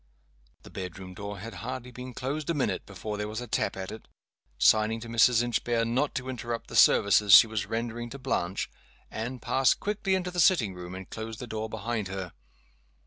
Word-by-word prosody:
The - - -13
bedroom 90 0 -7
door 100 +2 -6
had 115 +5 -8
hardly 125 +1 -5
been 125 0 -9
closed 145 +4 -3
a 170 - +1
minute 140 - -1
before 105 +2 -5
there 105 0 -3
was 110 +2 -4
a 125 - -5
tap 115 - -1
at 95 0 -5
it. 110 - -10 0.5
Signing 110 - +4
to 115 - -7
Mrs. 115 +1 +4
Inchbare 120 -1 0
not 125 +5 0
to 130 0 -3
interrupt 120 -2 -4
the - - -7
services 100 0 +6
she - - +10
was 110 -2 -3
rendering 115 +1 -3
to 140 - -8
Blanche, 95 -9 -2 0.4
Anne 120 +4 -4
passed 130 +2 +2
quickly 205 -2 0
into 180 -1 -2
the 175 - -3
sitting 155 - +4
room, 90 0 -8
and 95 0 -8
closed 110 0 -6
the 125 - -6
door 110 -1 -4
behind 110 -1 -3
her. 95 -2 -5
115 Hz, 195 wpm, -28 LUFS, 100-125 Hz, 0.5 s, she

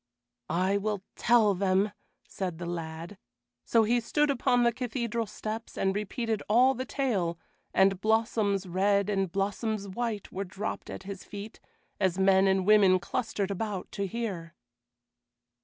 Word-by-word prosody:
"I 185 +4 +1
will 205 -1 -2
tell 225 -4 +4
them," 195 +2 +1 0.4
said 180 -4 -4
the 175 - -6
lad; 170 +2 -6 0.5
so 230 -1 +4
he 240 +3 +2
stood 295 +5 +1
upon 245 -2 +2
the 235 - +4
cathedral 235 -2 -2
steps 215 +2 -6
and 190 0 +1
repeated 220 +1 -2
all 250 +5 +5
the 260 0 -4
tale, 205 -12 -1 0.3
and 190 0 +3
blossoms 215 -3 +1
red 200 +3 +1
and 195 -3 0
blossoms 200 +2 -2
white 215 +1 -3
were 195 - -3
dropped 200 +3 -5
at - - -7
his 195 -1 -7
feet, 205 +1 -9 0.4
as 190 -2 +1
men 190 0 +4
and 190 -1 +2
women 200 -3 +6
clustered 200 +2 -2
about 200 -1 -4
to 200 -1 -2
hear. 185 -6 -4
200 Hz, 145 wpm, -29 LUFS, 190-225 Hz, 0.5 s, women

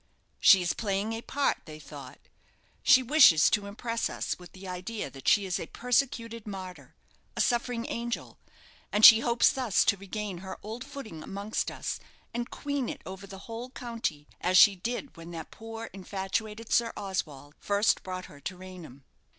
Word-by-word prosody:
She 190 -2 +7
is 175 - 0
playing 205 0 -1
a 225 - -4
part, 280 +3 0
they 155 -1 -9
thought; 140 -4 -10 0.6
she 260 - +6
wishes 255 - +7
to 200 -1 +1
impress 230 +3 -2
us - - -3
with 180 - -13
the 190 0 -10
idea 180 -2 -5
that 135 0 -11
she 205 - +5
is 185 -3 -1
a - - -5
persecuted 230 -3 -1
martyr 185 -3 -8 0.4
a - - -2
suffering 240 -1 0
angel; 235 0 -4 0.5
and 210 +1 +6
she 220 - +11
hopes 235 0 +3
thus 255 -8 +2
to 200 - +3
regain 200 -1 -5
her 190 +1 -7
old 225 +4 -6
footing 220 - -8
amongst 200 +6 -3
us, - - -4 0.3
and 240 +1 -3
queen 285 -3 -3
it - - -7
over 190 +1 -8
the 195 0 -10
whole 230 +2 -6
county, 230 - -4
as 185 +1 +3
she 200 +1 +8
did 240 +8 -4
when 165 0 -10
that 165 -2 -8
poor 225 0 -8
infatuated 205 +3 -4
Sir 235 -1 +3
Oswald 155 -8 -4
first 205 +1 +2
brought 185 -1 -6
her 145 -6 -14
to 185 +3 -5
Raynham. 180 -8 -11
205 Hz, 175 wpm, -29 LUFS, 185-230 Hz, 0.6 s, she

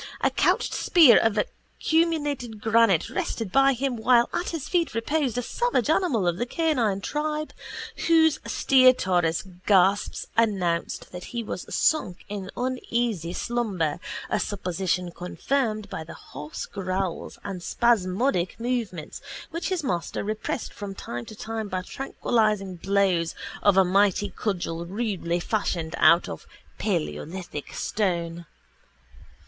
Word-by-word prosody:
A - - +3
couched - - +2
spear 315 - +6
of 225 -1 +1
acuminated 290 -2 -1
granite 225 -5 +3
rested 225 -5 -3
by 275 +3 +5
him 260 0 -1
while 240 +1 +4
at 350 - -1
his 325 -5 -4
feet 340 - 0
reposed 255 +1 0
a 245 - 0
savage 395 - +1
animal 275 - +2
of 175 0 +1
the 240 - -2
canine 245 - +1
tribe 300 +4 -2 0.5
whose 320 -2 +5
stertorous 190 -11 +3 0.2
gasps 195 0 +3
announced 190 -7 0
that 180 0 -7
he 235 -1 -4
was 185 - -6
sunk 195 - +1
in 200 -2 -5
uneasy 240 -8 -1
slumber, 195 -8 -1 0.3
a - - 0
supposition 180 -2 -2
confirmed 215 +5 -2
by 190 -5 -5
hoarse 150 -1 -7
growls 185 -2 -3
and 195 -3 -5
spasmodic 195 0 +1
movements 230 -10 -3 0.3
which 335 +4 -3
his 365 -4 -1
master 175 -10 -2
repressed 215 +1 -3
from 200 -3 -7
time 120 -9 -6
to 215 - -10
time 220 0 -4
by 185 -2 -3
tranquilising 215 -5 0
blows 190 -3 +1 0.3
of 200 -2 +4
a 190 - +6
mighty 200 +1 +2
cudgel 175 -6 -2
rudely 185 -3 -2
fashioned 170 -5 -1
out 170 +2 +6
of 80 - -8 0.3
paleolithic 150 - -3
stone. 170 -5 -2
205 Hz, 125 wpm, -26 LUFS, 180-245 Hz, 0.5 s, spear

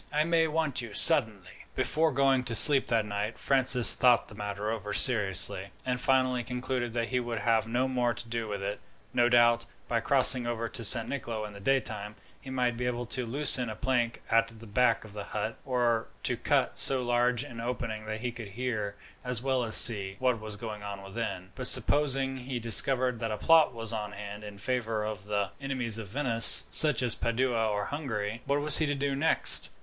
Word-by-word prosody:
I 150 0 0
may 165 0 +1
want 155 -5 -2
you 115 -3 -10
suddenly." 110 - -1
Before 160 +1 0
going 135 -1 +1
to 115 - -2
sleep 135 +4 +5
that 115 -2 0
night, 105 +2 -5
Francis 130 -3 +4
thought 125 -2 +2
the - - -13
matter 105 +1 -5
over 105 -2 -6
seriously, 105 -8 +1 0.2
and 125 -1 -3
finally 130 -2 0
concluded 125 0 -5
that 115 -1 -3
he 125 - -1
would 120 -1 -5
have 115 0 0
no 125 +3 -1
more 125 -2 -1
to 120 0 -7
do 115 -1 -5
with 100 -2 -6
it. 100 +1 -5 0.3
No 120 0 +2
doubt, 120 -1 +2 0.2
by 115 - -1
crossing 130 -1 +6
over 115 -1 -4
to 115 - -7
San 115 +1 +3
Nicolo 115 -6 -6
in 105 - -10
the 100 - -12
daytime, 105 -3 -3 0.3
he 135 - -12
might 125 -2 -2
be 125 +1 -3
able 120 0 -4
to 125 0 -5
loosen 130 -1 +2
a 110 - -7
plank 120 0 -3
at 115 0 +2
the 115 0 -14
back 115 +2 0
of 105 - -14
the 105 -1 -7
hut, 110 +1 -5
or 120 -3 -1 0.2
to - - -1
cut - - -1
so 130 -2 +4
large 120 0 0
an 120 -5 -10
opening 115 -3 -6
that 110 0 -6
he 125 0 -4
could 115 -2 -10
hear, 105 -2 -5 0.3
as 125 -2 -2
well 130 -2 -1
as 110 -2 0
see, 100 -4 +5
what 125 -3 -1
was 110 -1 -7
going 105 0 -8
on 100 -1 -8
within; 95 -2 -7
but 130 +2 -4
supposing 135 +1 +1
he 130 0 -6
discovered 125 +1 +2
that 115 0 -4
a 105 - -4
plot 165 +1 +3
was 115 -2 -5
on 105 -2 -6
hand 105 +1 -9
in 105 -1 -11
favour 115 -1 -3
of 105 -3 -7
the 100 -2 -3
enemies 125 -5 -1
of 110 - -8
Venice, 115 0 +8
such 150 -5 +5
as 120 -2 +2
Padua 115 -1 -2
or 105 -1 -3
Hungary, 115 -7 -5
what 140 +1 0
was 150 0 +3
he 155 - 0
to 145 - -2
do 140 0 -3
next? 155 +4 +3
120 Hz, 205 wpm, -27 LUFS, 110-130 Hz, 0.3 s, Venice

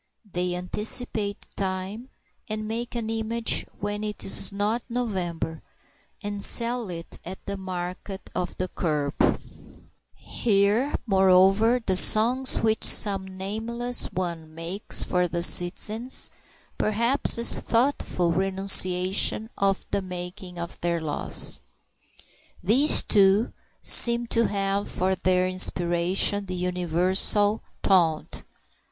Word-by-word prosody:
They 180 0 -1
anticipate 205 +3 -2
time, 195 +5 -4 0.4
and 215 0 -4
make 235 +2 -5
an 230 -2 -4
image 225 +1 -1
when 205 +1 -4
it 210 -1 -3
is 195 - +3
not 205 +4 -2
November, 180 -9 -4 0.6
and 205 -1 -4
sell 235 -2 +2
it 165 -1 -7
at 185 +2 -9
the 200 - -5
market 185 +1 -7
of 180 -1 -5
the 185 - -2
kerb. 150 -5 -3 1.0
Hear, 215 +5 0
moreover, 195 +3 +3
the 190 - +1
songs 240 +7 +5
which 220 -1 0
some 195 -2 +5
nameless 235 +5 0
one 170 -3 -6
makes 170 +5 -1
for 180 0 -1
the 170 0 -4
citizens, 210 +8 +3 0.5
perhaps 235 +7 +2
in 235 - -2
thoughtful 230 -10 +1
renunciation 190 +3 +3
of 195 -1 -1
the 200 - -1
making 180 0 -9
of 170 0 -8
their 170 -1 -1
laws. 155 -2 -2 1.0
These, 255 +11 +3
too, 200 +2 +2 0.3
seem 235 0 +5
to 230 0 +2
have 200 0 -2
for 185 +1 -1
their 185 -1 0
inspiration 185 +2 +1
the 185 - -5
universal 180 +4 +1 0.2
taunt. 170 -5 0
195 Hz, 110 wpm, -24 LUFS, 180-220 Hz, 1.0 s, songs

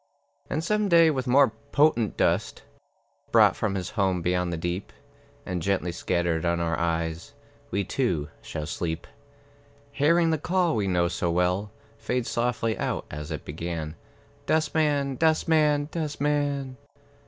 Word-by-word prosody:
And 155 - -1
some 210 +3 +1
day, 165 -2 +6
with 130 -3 -3
more 135 +1 +5 0.2
potent 140 -8 +3
dust, - - 0 0.7
Brought - - +6
from 100 -2 -1
his 90 -3 -3
home 95 -3 0
beyond 90 0 0
the 85 - -2
deep, 85 +4 -3 0.5
And 90 -2 -3
gently 90 -1 0
scattered 85 -1 -1
on 85 0 +1
our 85 -1 0
eyes, 80 0 -2 0.3
We, 100 - 0
too, 90 - -1
shall 75 -2 -5
sleep, 80 +1 -3 0.9
Hearing 165 +4 +3
the 160 - 0
call 175 0 +1
we 105 -2 0
know 90 -2 +2
so 85 0 -1
well 90 +4 0 0.3
Fade 125 -1 -1
softly 115 -2 0
out - - -2
as 75 0 -6
it 75 -3 -5
began, 80 0 -4 0.5
"Dustman, 150 -3 +1
dustman, 155 -2 +3
Dustman!" 145 -4 -1
105 Hz, 140 wpm, -26 LUFS, -, 0.9 s, day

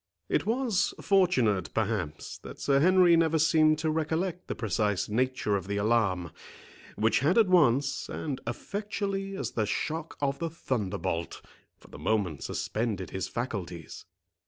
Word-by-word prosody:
It - - 0
was 230 -4 +1
fortunate, 130 - +2
perhaps, 75 0 -2
that - - -10
Sir 140 -1 +2
Henry 180 +1 +6
never 165 -1 +3
seemed 155 0 +4
to 160 0 0
recollect 160 +3 -2
the - - -3
precise 105 -2 0
nature 125 -1 0
of 95 -2 -3
the 100 0 -2
alarm, 100 -6 +1 0.6
which 110 +1 +2
had 155 - +2
at 225 -3 +6
once, 140 -6 +3
and 140 -5 -4
effectually 195 - -3
as - - -3
the 110 -3 -1
shock 160 +9 -3
of 140 -1 -1
the 165 - -2
thunderbolt, 100 - -3 0.3
for - - -19
the - - -11
moment 95 -9 0
suspended 105 -5 -3
his 95 -1 -3
faculties. 90 - -5
135 Hz, 145 wpm, -29 LUFS, 105-170 Hz, 0.6 s, Henry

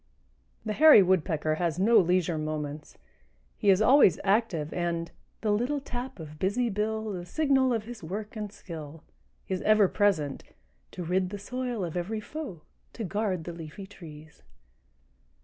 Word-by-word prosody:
The 215 - -1
Hairy 300 -6 +8
Woodpecker 160 -4 +1
has 170 -2 0
no 220 +4 +5
leisure 175 -3 +1
moments. 150 -1 -5 0.6
He 205 - +2
is 195 +2 +5
always 255 - +6
active 195 -7 +1
and 170 -1 -2 0.3
The 215 - +1
little 245 +8 0
tap 250 -3 -6
of 155 -1 -10
busy 225 +7 +1
bill 220 +1 -2
The 180 -3 -5
signal 265 - +2
of 225 -3 0
his 235 0 -9
work 205 +7 -6
and 210 -2 -5
skill. 160 -6 -9 0.4
is 185 -1 -2
ever 215 -2 +5
present 180 -10 0 0.5
To 180 - -5
rid 180 +2 0
the 205 - -5
soil 245 0 -3
of 165 - -6
every 190 +5 -2
foe, 240 - -7 0.3
To 230 - -5
guard 195 -2 -2
the 170 - -6
leafy 165 +4 -9
trees. 160 -6 -13
195 Hz, 155 wpm, -28 LUFS, 165-220 Hz, 0.6 s, Hairy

